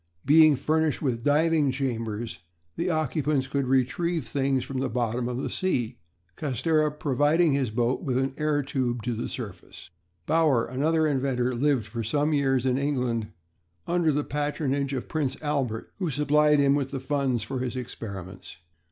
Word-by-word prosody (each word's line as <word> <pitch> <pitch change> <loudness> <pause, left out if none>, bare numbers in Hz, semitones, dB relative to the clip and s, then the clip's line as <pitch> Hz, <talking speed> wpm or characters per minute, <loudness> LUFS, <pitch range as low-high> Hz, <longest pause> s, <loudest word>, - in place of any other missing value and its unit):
Being 155 +1 +7
furnished 155 +2 0
with 120 -4 -1
diving 150 0 +3
chambers, 115 -4 -3 0.4
the 175 +2 -1
occupants 155 -3 0
could 135 0 -1
retrieve 145 +5 +1
things 135 +1 0
from 135 -1 -4
the 135 - -1
bottom 120 +1 -1
of 125 - -3
the 130 - -3
sea; 125 -10 -1 0.4
Castera 155 +3 +1
providing 150 +2 +2
his 135 -4 +1
boat 120 +3 0
with 125 -2 -1
an 135 0 0
air 150 -1 0
tube 125 -4 -2
to 125 - -1
the 115 - -4
surface. 100 -6 -8 0.3
Bauer, 155 -7 +3
another 155 +6 +1
inventor, 130 -3 0
lived 130 -2 +1
for 115 +1 -5
some 145 +7 +1
years 135 -3 +2
in 130 0 +2
England 125 -6 -1 0.6
under 170 -2 +2
the 145 0 0
patronage 145 -1 -1
of 130 -3 -3
Prince 145 -5 -2
Albert, 140 -7 -2
who 180 -4 -1
supplied 150 +1 +3
him 140 -1 +4
with 140 -2 0
funds 130 -3 0
for 130 +3 -4
his 125 0 -3
experiments. 100 -9 -7
135 Hz, 160 wpm, -26 LUFS, 125-150 Hz, 0.6 s, Being